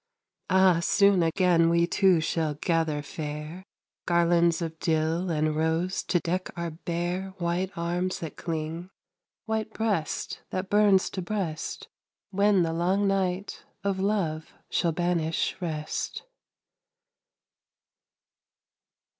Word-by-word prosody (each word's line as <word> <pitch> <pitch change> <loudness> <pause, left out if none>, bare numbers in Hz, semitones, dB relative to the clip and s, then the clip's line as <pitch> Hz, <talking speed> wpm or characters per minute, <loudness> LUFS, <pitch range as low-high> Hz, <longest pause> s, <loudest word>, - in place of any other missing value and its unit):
Ah, 190 -2 +5
soon 200 +1 +4
again 165 0 +3
we 170 0 +3
two 185 -1 +3
shall 155 -1 -1
gather 160 -2 0
fair 150 +4 -6 0.4
Garlands 170 -1 +3
of 160 -2 -5
dill 165 +2 0
and 155 -1 0
rose 160 +4 0
to 175 - +1
deck 180 +3 -2
our 170 -1 -3
bare 175 +3 -3
White 175 +2 -1
arms 175 +2 -1
that 160 - -6
cling, 165 +2 -4 0.6
white 220 0 -2
breast 210 -8 -2
that 185 0 -4
burns 205 -2 +5
to 190 - -4
breast, 175 -5 -4 0.4
When 200 -1 +3
the 165 -1 -1
long 185 +4 +1
night 195 0 -1 0.2
of 200 -1 0
love 185 -6 -1 0.2
shall 170 - +2
banish 165 -1 0
rest. 155 -3 -3
175 Hz, 115 wpm, -27 LUFS, 160-190 Hz, 0.6 s, Ah